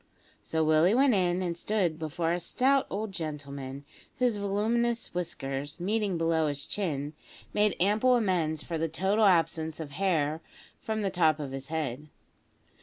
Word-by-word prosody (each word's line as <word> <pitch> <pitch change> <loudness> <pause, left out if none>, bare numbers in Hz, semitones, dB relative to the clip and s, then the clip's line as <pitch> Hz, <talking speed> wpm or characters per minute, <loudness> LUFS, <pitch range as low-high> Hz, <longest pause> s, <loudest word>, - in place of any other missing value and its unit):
So 160 0 0
Willie 155 +6 +4
went 270 0 +5
in, 180 -2 +1
and 170 -2 -2
stood 175 -3 0
before 165 +1 -1
a 175 - 0
stout 265 +9 +2
old 210 +1 -3
gentleman, 140 -5 -6 0.3
whose 245 -4 +2
voluminous 225 +4 0
whiskers, 145 -4 -4
meeting 200 0 0
below 165 -1 +2
his 145 -1 -4
chin, 150 -7 -2 0.4
made 210 -1 +3
ample 215 +7 +4
amends 175 -9 0
for 165 -2 -4
the 165 0 0
total 195 +7 +2
absence 165 -4 +2
of 155 -3 -6
hair 155 -2 0 0.4
from 220 -1 -2
the 195 - 0
top 160 -4 +3
of 140 -3 -5
his 135 0 -6
head. 150 -3 -3
170 Hz, 155 wpm, -29 LUFS, 155-205 Hz, 0.4 s, went